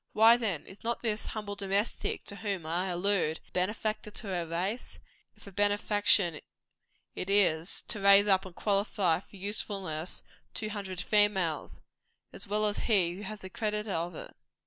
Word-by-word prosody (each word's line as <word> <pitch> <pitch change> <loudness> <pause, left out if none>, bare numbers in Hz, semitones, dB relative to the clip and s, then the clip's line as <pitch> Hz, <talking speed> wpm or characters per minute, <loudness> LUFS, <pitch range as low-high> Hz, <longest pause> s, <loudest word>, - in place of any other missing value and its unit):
Why, 225 +2 +7
then, 215 -10 -2
is 190 - -14
not 235 +1 -2
this 220 -2 -1
humble 210 -2 -5
domestic 200 +2 -1
to 200 - -5
whom 200 -6 -3
I 175 +4 -1
allude, 180 -3 +1
a - - -27
benefactor 210 +3 -2
to 210 +1 -9
her 175 -3 -2
race 185 +8 -3 0.4
if - - -19
a 200 - -10
benefaction 205 -3 +2 0.7
it 185 - -5
is, 180 -4 +3
to 215 - -5
raise 200 +1 +7
up 190 -2 +4
and 185 -3 -11
qualify 200 -4 +1
for 200 - -18
usefulness 190 -4 -3 0.3
two 215 - -3
hundred 195 -3 -4
females 195 -7 +1 0.5
as - - -7
well 210 +1 0
as 205 -1 -1
he 185 -6 +3
who - - -8
has 210 +1 -7
the 190 - -8
whole - - -13
credit 210 -1 -1
of 175 -3 -2
it? - - -9
200 Hz, 170 wpm, -30 LUFS, 180-210 Hz, 0.7 s, Why